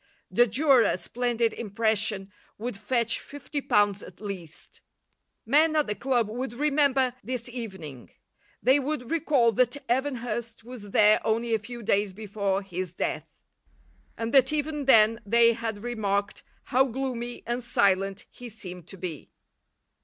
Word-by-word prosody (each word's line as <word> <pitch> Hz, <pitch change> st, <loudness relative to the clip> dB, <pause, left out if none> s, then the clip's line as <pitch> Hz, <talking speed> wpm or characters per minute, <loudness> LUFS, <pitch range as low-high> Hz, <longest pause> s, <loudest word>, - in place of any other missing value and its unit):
The 240 Hz, 0 st, +4 dB
Durer, 265 Hz, +3 st, +4 dB
a 225 Hz, -, +2 dB
splendid 235 Hz, +4 st, -1 dB
impression, 210 Hz, -2 st, -1 dB, 0.3 s
would 235 Hz, +1 st, -4 dB
fetch 230 Hz, +3 st, 0 dB
fifty 290 Hz, +1 st, -6 dB
pounds 205 Hz, -4 st, +2 dB
at 180 Hz, -, -12 dB
least. 190 Hz, -6 st, -8 dB, 0.6 s
Men 310 Hz, +2 st, +4 dB
at 305 Hz, -1 st, +3 dB
the 210 Hz, -, -2 dB
club 240 Hz, -1 st, 0 dB
would 240 Hz, +2 st, -5 dB
remember 275 Hz, -2 st, +2 dB
this 245 Hz, +2 st, -2 dB
evening. 190 Hz, -, -7 dB, 0.5 s
They 260 Hz, +4 st, +5 dB
would 270 Hz, -3 st, -3 dB
recall 295 Hz, -8 st, +3 dB
that 245 Hz, +4 st, +2 dB
Evan 265 Hz, +3 st, +1 dB
Hurst 230 Hz, -1 st, -5 dB
was 230 Hz, -4 st, -9 dB
there 210 Hz, +1 st, +5 dB
only 230 Hz, +1 st, 0 dB
a 220 Hz, -, +2 dB
few 235 Hz, +3 st, -9 dB
days 200 Hz, -1 st, +1 dB
before 200 Hz, -1 st, -2 dB
his 185 Hz, -2 st, -5 dB
death, -, -, -4 dB, 0.8 s
and 230 Hz, +1 st, -3 dB
that 265 Hz, -1 st, +6 dB
even 300 Hz, -1 st, -2 dB
then 225 Hz, -3 st, +5 dB
they 230 Hz, +3 st, +5 dB
had 225 Hz, -2 st, -5 dB
remarked 205 Hz, -4 st, -2 dB, 0.2 s
how 260 Hz, +2 st, +3 dB
gloomy 245 Hz, -2 st, -4 dB
and 240 Hz, +2 st, -2 dB
silent 195 Hz, -4 st, +1 dB
he 245 Hz, -1 st, -10 dB
seemed 180 Hz, -5 st, -8 dB
to 195 Hz, -, -8 dB
be. 170 Hz, -5 st, -6 dB
230 Hz, 145 wpm, -27 LUFS, 205-255 Hz, 0.8 s, that